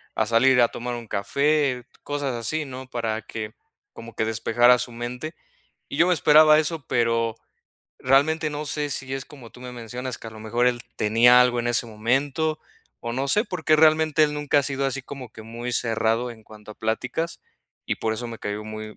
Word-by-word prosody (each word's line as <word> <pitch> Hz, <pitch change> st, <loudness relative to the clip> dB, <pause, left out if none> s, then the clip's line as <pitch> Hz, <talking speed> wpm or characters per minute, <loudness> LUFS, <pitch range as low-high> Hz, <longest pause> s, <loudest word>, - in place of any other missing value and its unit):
a 110 Hz, -, +1 dB
salir 125 Hz, +3 st, +4 dB
a 120 Hz, -, +4 dB
tomar 120 Hz, +1 st, -5 dB
un 120 Hz, -1 st, -8 dB
café, 140 Hz, +4 st, 0 dB, 0.2 s
cosas 145 Hz, -2 st, -2 dB
así, 120 Hz, +7 st, -2 dB
¿no?, 130 Hz, -1 st, -9 dB
para 115 Hz, -3 st, -2 dB
que, 110 Hz, -1 st, -6 dB, 0.4 s
como 115 Hz, 0 st, -11 dB
que -, -, 0 dB
despejara 120 Hz, +3 st, +4 dB
su 120 Hz, -, -3 dB
mente. 125 Hz, +6 st, -6 dB, 0.6 s
Y -, -, -6 dB
yo 170 Hz, -, +5 dB
me 180 Hz, -, +4 dB
esperaba 155 Hz, 0 st, +6 dB
eso, 155 Hz, -2 st, -2 dB
pero, 115 Hz, -1 st, +1 dB, 0.6 s
realmente 155 Hz, +4 st, +2 dB
no 150 Hz, +1 st, -5 dB
sé, 145 Hz, +1 st, -2 dB
si 135 Hz, +1 st, -3 dB
es 135 Hz, -1 st, -5 dB
como 130 Hz, -6 st, -13 dB
tú -, -, -16 dB
me 125 Hz, 0 st, -7 dB
mencionas, 125 Hz, +1 st, -6 dB
que -, -, -10 dB
a -, -, -11 dB
lo 110 Hz, 0 st, -11 dB
mejor 120 Hz, +3 st, 0 dB
él 120 Hz, -1 st, +1 dB, 0.2 s
tenía 120 Hz, +4 st, +5 dB
algo 125 Hz, -1 st, +3 dB
en 120 Hz, -, -2 dB
ese 120 Hz, 0 st, +2 dB
momento, 135 Hz, +8 st, -1 dB, 0.4 s
o 115 Hz, 0 st, -3 dB
no 135 Hz, +3 st, -2 dB
sé, 210 Hz, +10 st, +3 dB
porque 160 Hz, -7 st, +1 dB
realmente 155 Hz, 0 st, +4 dB
él 150 Hz, -, -2 dB
nunca 150 Hz, 0 st, +1 dB
ha -, -, -4 dB
sido 135 Hz, 0 st, -2 dB
así 135 Hz, 0 st, -3 dB
como 130 Hz, -3 st, -9 dB
que 110 Hz, -, -11 dB
muy 120 Hz, +2 st, -6 dB
cerrado 115 Hz, +1 st, 0 dB
en 110 Hz, -1 st, -16 dB
cuanto 105 Hz, 0 st, -12 dB
a -, -, -20 dB
pláticas, 125 Hz, +9 st, -3 dB, 0.5 s
y -, -, 0 dB
por 110 Hz, -, -1 dB
eso 120 Hz, +2 st, -4 dB
me 115 Hz, -1 st, -8 dB
cayó 105 Hz, +1 st, -4 dB
muy, 110 Hz, 0 st, -8 dB
125 Hz, 205 wpm, -24 LUFS, 115-145 Hz, 0.6 s, esperaba